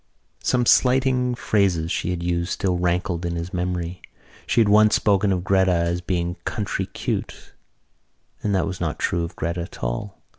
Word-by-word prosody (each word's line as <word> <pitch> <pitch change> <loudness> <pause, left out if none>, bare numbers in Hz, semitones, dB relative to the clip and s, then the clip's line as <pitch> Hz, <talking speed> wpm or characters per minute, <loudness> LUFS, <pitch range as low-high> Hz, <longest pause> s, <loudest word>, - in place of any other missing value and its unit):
Some 125 -1 +1
slighting 125 0 +3
phrases 95 -8 +1
she - - -1
had 90 -1 -2
used 85 0 -1
still 95 -2 0
rankled 90 0 0
in 85 0 -2
his 85 +1 -5
memory; 90 0 -3 0.5
she - - +2
had 110 - +5
once 105 +1 +5
spoken 100 -1 +2
of 90 -2 0
Gretta 95 -1 +3
as 85 +1 0
being 90 0 -2
country 100 -2 -2
cute - - -5 0.9
and 100 -2 0
that 95 - +2
was 95 -2 -5
not 80 -3 -2
true 85 -1 0
of 85 - -6
Gretta 85 +2 -2
at 85 - -9
all. - - -3
90 Hz, 175 wpm, -23 LUFS, 85-100 Hz, 0.9 s, had